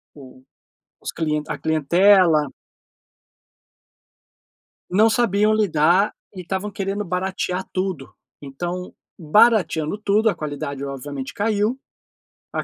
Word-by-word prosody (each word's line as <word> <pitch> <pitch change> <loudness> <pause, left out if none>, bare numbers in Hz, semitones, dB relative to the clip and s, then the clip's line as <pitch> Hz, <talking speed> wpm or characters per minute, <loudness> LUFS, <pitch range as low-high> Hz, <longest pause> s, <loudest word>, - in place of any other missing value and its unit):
o 130 -2 -14 0.6
os - - -4
cli 150 -2 -1
a - - -4
clientela 160 0 +3 2.4
Não 215 +5 +4
sabiam 215 -2 +2
lidar 185 -1 +2 0.2
e 185 - -6
estavam 190 +3 -4
querendo 200 +1 -3
baratear 185 0 -2
tudo, 185 -7 -4 0.3
então, 175 +6 -6 0.2
barateando 175 -2 +3
tudo, 210 +1 +2
a - - -2
qualidade 145 -2 -5
obviamente 140 0 -6
caiu, 215 +4 0 0.7
a - - -2
180 Hz, 100 wpm, -21 LUFS, 150-205 Hz, 2.4 s, Não